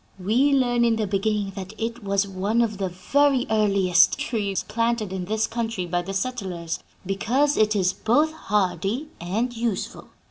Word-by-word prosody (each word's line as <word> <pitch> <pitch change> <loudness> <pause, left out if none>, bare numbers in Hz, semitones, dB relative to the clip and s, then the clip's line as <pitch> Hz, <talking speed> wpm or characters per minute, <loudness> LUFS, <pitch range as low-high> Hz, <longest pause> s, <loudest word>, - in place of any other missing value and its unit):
We 235 +10 +2
learn 245 -3 +2
in 230 -1 +3
the 220 -1 -1
beginning 200 0 -1
that 190 +1 -7
it 230 +1 -4
was 200 0 +1
one 200 +5 0
of 210 -3 -3
the 190 -1 -1
very 265 +9 +2
earliest 195 -4 +4
trees 205 -5 -2
planted 230 -2 -1
in 185 -1 -3
this 215 +3 0
country 225 -5 -3
by 175 0 -1
the 185 +2 -6
settlers, 190 -7 -3 0.3
because 250 +10 +1
it 215 0 +2
is 185 -2 +2
both 295 +11 +2
hardy 205 - -1
and 225 +8 -2
useful. 225 -4 -3
210 Hz, 165 wpm, -24 LUFS, 190-235 Hz, 0.3 s, earliest